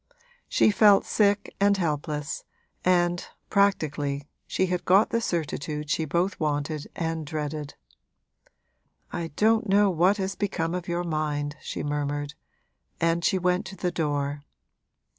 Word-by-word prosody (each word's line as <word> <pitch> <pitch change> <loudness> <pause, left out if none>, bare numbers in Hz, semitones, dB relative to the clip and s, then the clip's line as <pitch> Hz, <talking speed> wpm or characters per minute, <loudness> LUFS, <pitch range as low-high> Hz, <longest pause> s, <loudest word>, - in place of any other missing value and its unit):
She - - +4
felt 205 -1 +6
sick 205 -1 +1
and 200 0 +4
helpless, 150 -3 -2 0.4
and, 175 -1 +2 0.3
practically, 150 -8 +1 0.2
she 190 - +1
had 180 -1 -2
got 195 +4 +4
the 230 - +1
certitude 150 - -3
she 160 - +1
both 175 +5 0
wanted 150 0 -1
and 165 -1 -2
dreaded. 150 -1 -4 1.4
'I 170 -1 -3
don't 220 0 +3
know 200 0 +5
what 180 +4 +3
has 195 0 -2
become 180 -4 -2
of 180 -1 -4
your 175 0 -1
mind,' 150 -3 -2
she - - -5
murmured; 145 0 -2 0.7
and 165 +1 +1
she 190 - +3
went 180 0 +1
to 190 - -8
the 180 -2 -1
door. 145 -3 -1
170 Hz, 135 wpm, -26 LUFS, 150-190 Hz, 1.4 s, felt